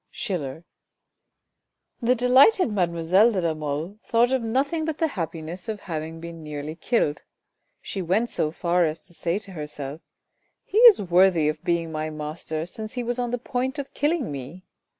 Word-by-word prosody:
— - - -53
Schiller. 165 - -4 1.4
The 245 +2 +3
delighted 260 - +5
mademoiselle 180 +3 +3
de 200 - -1
la 165 -2 +1
Mole 155 +6 -4
thought 240 +2 +2
of 260 - +2
nothing 275 +8 0
but 315 -1 -2
the 325 - +1
happiness 170 - -5
of 210 -2 -4
having 160 -1 -5
been 165 0 -8
nearly 150 0 -5
killed. 165 -4 0 0.6
She 195 - -4
went 200 +7 +1
so 155 - 0
far 175 +2 +1
as 155 -1 -2
to 175 - -16
say 170 +1 -1
to 205 -2 -9
herself, 150 -2 -7 0.3
" - - -48
he 425 - +1
is 470 -3 +9
worthy 175 -3 +4
of 155 0 -5
being 170 -1 0
my 155 0 -3
master 155 +1 -4
since 215 +5 -6
he 250 -1 -3
was 240 +1 -2
on 245 -1 -1
the 245 - -1
point 255 +2 -2
of 280 -1 -6
killing 295 - 0
me. 140 +7 -7
180 Hz, 180 wpm, -25 LUFS, 160-240 Hz, 1.4 s, is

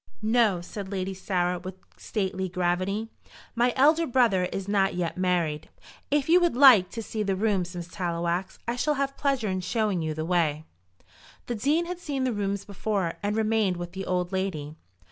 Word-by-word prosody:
"No," 220 -5 +3
said 190 +2 -7
Lady 190 -1 -2
Sarah, 180 -2 -1
with 185 +1 -7 0.2
stately 190 -3 -3
gravity; 185 +5 -1 0.4
"my 240 +1 +2
elder 310 +5 +4
brother 235 -8 +3
is 195 +1 -5
not 195 -2 +2
yet 175 -2 -2
married. 175 -5 0 0.4
If 285 -1 +1
you 345 +2 +6
would 345 -7 +2
like 250 -9 +7
to 230 - -4
see 215 0 -4
the 195 -2 0
rooms, 190 -3 0
Miss 175 -1 -5
Tallowax, 175 0 -2
I 235 +1 -1
shall 300 +4 +1
have 275 0 -1
pleasure 275 -6 0
in 185 0 -1
showing 205 -1 0
you 155 -1 -2
the 155 0 -3
way." 160 -3 0 0.8
The 240 - -3
Dean 290 +10 +1
had 355 0 -5
seen 285 -6 -3
the 255 -2 0
rooms 200 -1 -2
before, 200 -3 -2
and 205 +1 -1
remained 215 -4 +1
with 175 0 -6
the 190 +1 -6
old 180 0 -1
lady. 170 -6 -3
195 Hz, 185 wpm, -27 LUFS, 180-230 Hz, 0.8 s, like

